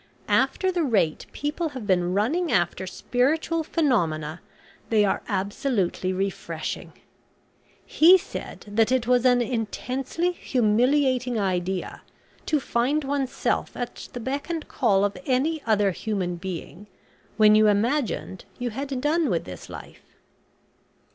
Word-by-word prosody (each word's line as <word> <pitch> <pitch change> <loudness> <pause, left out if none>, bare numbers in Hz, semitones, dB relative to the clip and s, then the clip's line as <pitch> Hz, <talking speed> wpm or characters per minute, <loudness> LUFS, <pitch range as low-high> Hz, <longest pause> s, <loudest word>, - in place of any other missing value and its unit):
After 375 -1 +2
the 355 -1 0
rate 200 - +1
people 300 +3 -2
have 230 - -6
been 180 -2 +1
running 305 - +1
after 180 +1 0
spiritual 310 - 0
phenomena, 175 - 0 0.5
they 215 -2 +4
are 195 - 0
absolutely 195 -1 -1
refreshing. 195 +1 -4 0.9
He 350 +4 +7
said - - -8
that 220 +3 +2
it 255 -2 +2
was 250 0 +3
an 245 -1 +5
intensely 255 - -2
humiliating 250 -2 +1
idea 185 -1 -2 0.5
to 305 - +2
find 270 +4 0
oneself 275 -1 -1
at 245 - -5
the 245 - -5
beck 275 +6 -4
and 330 -2 -3
call 205 -6 +2
of 205 - -2
any 285 +5 +1
other 205 -3 +3
human 185 -2 -2
being 185 +1 -7 0.5
when 215 -1 +7
you 215 0 +6
imagined 215 -2 0
you 245 -1 -3
had 270 +2 -4
done 305 +1 +2
with 170 -3 0
this 90 -2 -10
life." - - -12
240 Hz, 130 wpm, -25 LUFS, 195-280 Hz, 0.9 s, He